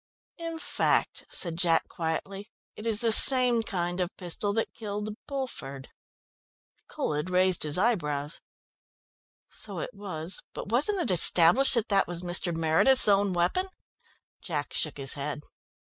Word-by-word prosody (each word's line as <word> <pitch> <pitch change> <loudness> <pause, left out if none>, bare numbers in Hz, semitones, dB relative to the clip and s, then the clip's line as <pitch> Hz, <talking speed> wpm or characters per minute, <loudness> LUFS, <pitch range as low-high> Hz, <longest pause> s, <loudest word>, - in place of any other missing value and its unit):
"In 330 -1 -5
fact," - - -1
said 170 -3 -2
Jack 170 -2 +2
quietly, 195 +5 -5 0.3
"it 215 - -7
is 220 -1 0
the 230 -1 +2
same 250 0 +7
kind 175 -4 -4
of 175 - -1
pistol 185 +3 -2
that 225 +1 -2
killed 210 -1 -6
Bulford." 140 - -6 1.0
Colhead 150 +4 -3
raised 185 0 +2
his 150 +1 +4
eyebrows. 150 -9 -1 1.1
"So - - -6
it - - -5
was, 180 -3 -6
but - - -7
wasn't 300 - +1
it 310 - -1
established 180 - +5
that 235 -2 0
that 200 -2 +2
was 175 0 -3
Mr. 175 0 +2
Meredith's 165 +12 +3
own 200 -1 +3
weapon?" 180 - 0 0.7
Jack 150 -5 -4
shook 155 - -2
his 135 -1 +1
head. 145 +1 -5
185 Hz, 140 wpm, -27 LUFS, 165-225 Hz, 1.1 s, same